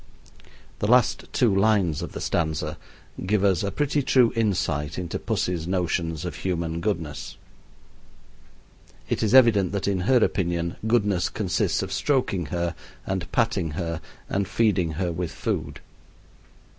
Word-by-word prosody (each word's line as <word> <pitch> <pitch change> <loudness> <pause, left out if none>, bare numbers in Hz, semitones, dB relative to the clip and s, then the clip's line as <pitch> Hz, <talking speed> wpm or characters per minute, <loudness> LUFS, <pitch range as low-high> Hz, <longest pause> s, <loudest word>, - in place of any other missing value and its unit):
The 105 - 0
last 125 +1 +3
two 115 -6 +2
lines 95 -6 +2
of - - -6
the - - -6
stanza 80 -1 -1 0.4
give 100 +1 +1
us 95 -4 +3
a 100 - -1
pretty 145 0 0
true 130 -3 +4
insight 90 -9 0
into 90 -3 -3
pussy's 85 -2 -2
notions 85 -2 -1
of 90 - -5
human 85 -3 -2
goodness. 85 -8 -3 1.7
It - - 0
is 110 +3 +2
evident 110 -7 +5
that 100 -1 -1
in 100 -2 +1
her 130 - +6
opinion 85 -6 0
goodness 105 -6 +2
consists 100 -5 0
of - - -5
stroking 125 - 0
her, 85 0 -2 0.3
and 95 -2 -3
patting 95 -9 0
her, 85 -2 -3 0.3
and 100 -1 -1
feeding 95 -5 +1
her 90 +2 -1
with 85 0 -3
food. - - -3
95 Hz, 140 wpm, -25 LUFS, 85-105 Hz, 1.7 s, her